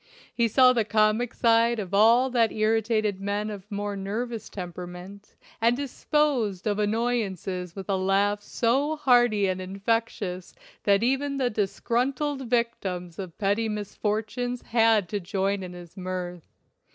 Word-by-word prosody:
He 235 -1 +2
saw 255 +3 +6
the 235 -3 +2
comic 215 +2 +2
side 230 0 +3
of 195 -3 -5
all 230 +5 +5
that 230 -2 +3
irritated 215 -2 +1
men 205 +2 -2
of 205 0 -9
more 205 -1 -3
nervous 220 +4 -4
temperament, 180 +2 -8 0.3
and 235 +2 +3
disposed 275 - 0
of 210 -1 0
annoyances 205 -5 -1
with 195 -2 -7
a 195 - +1
laugh 200 +2 +1
so 270 +9 0
hearty 240 -7 +3
and 185 -1 -1
infectious 195 -1 -2 0.3
that 200 +1 +4
even 275 +3 0
the 255 -2 0
disgruntled 255 +6 -1
victims 190 -8 -2
of 185 -4 -7
petty 210 +2 +1
misfortunes 215 +4 -3
had 225 -4 +3
to 205 - -2
join 195 +1 -1
in 180 -1 -7
his 175 -1 -12
mirth. 180 -2 -5
215 Hz, 140 wpm, -26 LUFS, 195-235 Hz, 0.3 s, saw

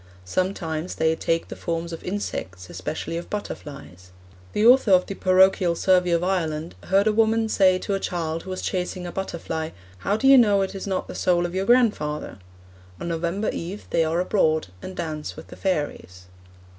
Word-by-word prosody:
Sometimes 165 - -2
they 160 0 +2
'take 165 0 -1
the - - -6
forms 170 0 -3
of 165 - -7
insects, 95 - -5
especially 125 - -4
of 170 - -7
butterflies.' 140 - -7 0.4
The 210 - +2
author 250 -1 +6
of 185 -1 +5
the - - -5
Parochial 185 -2 +4
Survey 180 0 +3
of 170 0 +2
Ireland 165 -4 -1
'heard 195 +2 +3
a 215 - +3
woman 225 0 +3
say 185 -3 +4
to 200 - -3
a 195 - 0
child 165 -3 -3
who - - -10
was 185 - -4
chasing 180 0 -2
a 175 - -5
butterfly, 165 -4 -4 0.3
"How 200 - 0
do 270 - +1
you 270 -1 +9
know 205 -4 +4
it 190 - -4
is 195 0 -6
not 190 -1 -2
the - - -7
soul 175 -1 +1
of 175 - -4
your 190 +1 -1
grandfather?" 210 - +1 0.6
On 170 - -4
November 170 +5 -1
eve 185 +5 -6
they 165 - +3
are 160 +2 0
abroad, 160 - +1
and 185 - -7
dance 155 -3 -4
with - - -11
the - - -10
fairies.' 145 - -3
180 Hz, 190 wpm, -24 LUFS, 160-195 Hz, 0.6 s, you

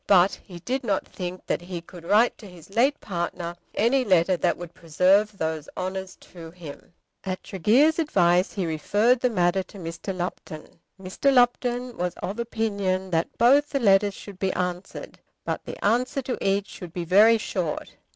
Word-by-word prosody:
But 190 -1 +5
he 180 - -11
did 260 +10 -3
not 200 -5 -1
think 180 0 -7
that - - -1
he 175 0 -6
could 170 0 -13
write 215 +7 +4
to 215 - -11
his 180 0 -15
late 265 +7 +2
partner 175 -2 -4 0.2
any 255 +5 +3
letter 185 -4 +3
that 175 0 0
would 175 -1 -9
preserve 190 +6 +2
those 160 -2 -3
honours 185 0 -4
to 165 -2 -11
him. 165 -3 -11 0.3
At 185 -1 -4
Tregear's 250 - +3
advice 180 - +2
he 190 -4 -2
referred 205 +10 +2
the 250 - +2
matter 180 -3 +1
to 195 - -13
Mr. 170 +1 -6
Lupton. 170 -3 -6 0.2
Mr. 190 +9 0
Lupton 245 -1 +2
was 180 0 -2
of 200 +5 -5
opinion 200 -5 -2
that 165 0 -1
both 280 +5 +5
the 275 - -1
letters 200 -3 +3
should 200 -3 -11
be 190 -1 0
answered, 180 0 -5 0.3
but - - -3
that - - -5
the - - -7
answer 250 +5 +1
to 250 - -3
each 195 0 +1
should 175 -2 -10
be 175 -1 -4
very 210 +6 +6
short. 180 -7 -4
190 Hz, 180 wpm, -25 LUFS, 175-225 Hz, 0.3 s, very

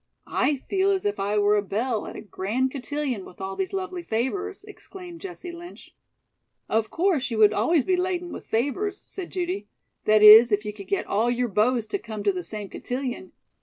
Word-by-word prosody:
"I 295 - +1
feel 385 +8 0
as 385 -1 0
if 205 0 -1
I 200 +2 0
were 205 0 +4
a 205 - +2
belle 215 +3 -2
at - - -8
a - - -7
grand 225 +6 -2
cotillion 275 -5 -3
with 180 - -14
all 190 0 -4
these 380 -1 -2
lovely 375 -2 -4
favors," 360 - -3
exclaimed 365 -4 -11
Jessie 360 -2 -7
Lynch. 345 +1 -12 0.7
"Of 220 0 0
course, 335 -7 +1
you 230 - -3
would 215 -1 +6
always 255 +8 +2
be 370 - +2
laden 360 -1 -2
with - - -9
favors," 290 - -1
said 375 -3 -8
Judy; 365 +2 -3 0.4
"that 215 0 +5
is, 220 +2 +10
if 210 +1 +1
you 210 - -4
could 200 -2 -11
get 200 - -1
all 220 +4 +1
your 245 0 0
beaux 225 +5 +2
to 225 - -4
come 215 - -7
to 200 - +3
the 185 -1 -4
same 205 +4 -6
cotillion. 260 - -5
250 Hz, 205 wpm, -25 LUFS, -, 0.7 s, is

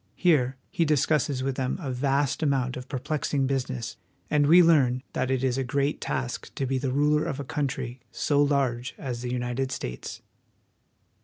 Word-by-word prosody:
Here 135 -8 +2
he 170 - +1
discusses 150 -3 +1
with 135 -1 -2
them 130 -1 -1
a 140 -7 -4
vast 135 +3 0
amount 135 -4 +1
of 125 0 -8
perplexing 140 0 -1
business; 130 -3 -2 0.3
and 145 -1 +4
we 175 +3 +8
learn 135 -6 +4
that 130 0 -1
it 130 -1 0
is 130 0 +1
a - - 0
great 140 +3 -1
task 130 -2 -3
to 135 - -1
be 130 0 0
the 130 -1 -1
ruler 150 +3 +3
of 140 - -3
a - - -3
country 130 -3 -3
so 145 -1 +1
large 130 -3 +1
as 125 -3 -4
the 125 0 -3
United 125 +1 -2
States. - - -6
135 Hz, 175 wpm, -27 LUFS, 125-145 Hz, 0.3 s, we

